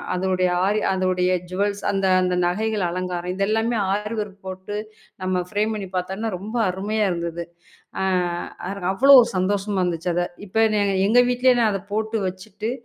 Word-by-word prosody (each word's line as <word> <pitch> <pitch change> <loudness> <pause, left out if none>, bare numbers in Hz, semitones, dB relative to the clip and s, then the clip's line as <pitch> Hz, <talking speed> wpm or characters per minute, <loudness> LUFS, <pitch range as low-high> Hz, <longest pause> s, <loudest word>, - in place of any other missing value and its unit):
அதோடைய 185 0 +1 0.4
அதோடைய 185 -1 +1
அரி 180 - -11
ஜூவல்ஸ் 200 +2 -1
அந்த 195 -1 0
அந்த 180 0 0
நகைகள், 210 +2 0
அலங்காரம் 180 0 -3
இதெல்லாமே 220 +4 0
ஆரி 210 +3 -2
வொர்க் 200 -1 -8
போட்டு 190 +2 -5 0.5
நம்ம 185 -1 0
ஃபரேம் 215 +2 0
பண்ணி 200 -3 -5
பார்த்தான்னா, 190 +5 -3
ரொம்ப 215 +5 -5
அருமையா 205 +3 -1
இருந்தது. 170 0 -4 0.6
அ - - 0 0.7
அதுல 195 -2 -4
அவ்ளோ 275 +8 +6
ஒரு - - -1
சந்தோஷமா 200 +2 0
இருந்துச்சு, 175 0 -1
அத. 175 - +1 0.2
இப்ப 215 +3 0
நான் 205 -1 +2 0.2
எங்க 240 +3 +6
வீட்லயே 250 +1 +4
நான் 225 -2 +3
அதைப் 195 0 -6
போட்டு 220 +1 -1
வச்சிட்டு, 190 +4 -6
195 Hz, 160 wpm, -23 LUFS, 185-215 Hz, 0.7 s, அவ்ளோ